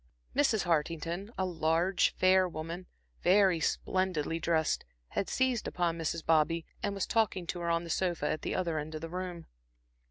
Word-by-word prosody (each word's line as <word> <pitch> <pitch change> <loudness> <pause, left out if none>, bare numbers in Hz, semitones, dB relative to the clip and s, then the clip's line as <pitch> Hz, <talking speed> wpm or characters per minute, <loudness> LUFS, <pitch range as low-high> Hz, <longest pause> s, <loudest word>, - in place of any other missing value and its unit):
Mrs. 225 -8 +3
Hartington, 165 +3 -1
a 190 - +1
large 170 +2 +1
fair 185 0 +4
woman, 165 +3 -6 0.3
very 190 -2 +4
splendidly 165 -1 0
dressed, 160 -2 +1 0.3
had 195 - -2
seized 260 -3 +1
upon 175 -2 0
Mrs. 165 0 -2
Bobby 165 +1 +3 0.2
and 205 -1 -1
was 195 - -1
talking 210 -5 +1
to 175 +1 -4
her 170 0 -2
on 170 0 +1
a - - -8
sofa 175 0 0
at 155 - -1
the - - -2
other 170 -4 0
end 155 +1 -6
of 155 - -5
the 165 - -5
room. 180 -1 -5
175 Hz, 170 wpm, -31 LUFS, 165-185 Hz, 0.3 s, fair